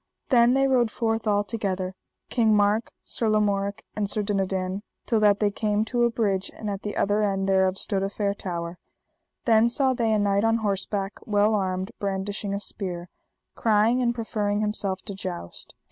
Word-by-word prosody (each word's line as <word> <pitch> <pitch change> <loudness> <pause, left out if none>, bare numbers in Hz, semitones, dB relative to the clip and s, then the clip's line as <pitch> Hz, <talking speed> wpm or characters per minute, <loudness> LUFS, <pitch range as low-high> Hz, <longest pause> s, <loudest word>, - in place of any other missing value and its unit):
Then 245 -2 +5
they 270 0 +3
rode 250 -4 +3
forth 225 0 -1
all 205 -1 +3
together, 195 -4 -3 0.4
King 225 -3 +3
Mark, 210 +2 +2 0.2
Sir 225 - -1
Lamorak, 200 -1 +1
and 205 -2 -1
Sir 210 - -1
Dinadan, 190 -1 -1 0.2
till 225 - +2
that 205 -1 +4
they 210 -1 +2
came 210 0 0
to 240 +1 +1
a - - +3
bridge, 200 -5 0
and 210 -2 -4
at 195 0 -4
the 210 - -4
end 200 -1 +1
thereof 190 -1 +3
stood 195 -1 -1
a 195 - -1
fair 200 0 -1
tower. 175 -3 -5 0.7
Then 225 0 +5
saw 260 +2 +2
they 230 -3 0
a 215 - +3
knight 200 0 +2
on 225 0 +3
horseback 200 -2 -2
well 210 0 +3
armed, 190 -2 -1
brandishing 200 +1 -3
a - - -2
spear, 180 -4 -5 0.4
crying 225 +3 +3
and 240 -1 +1
proffering 210 -3 -1
himself 200 -3 -1
to 200 - -6
joust. 185 - -7
205 Hz, 175 wpm, -25 LUFS, 195-220 Hz, 0.7 s, Then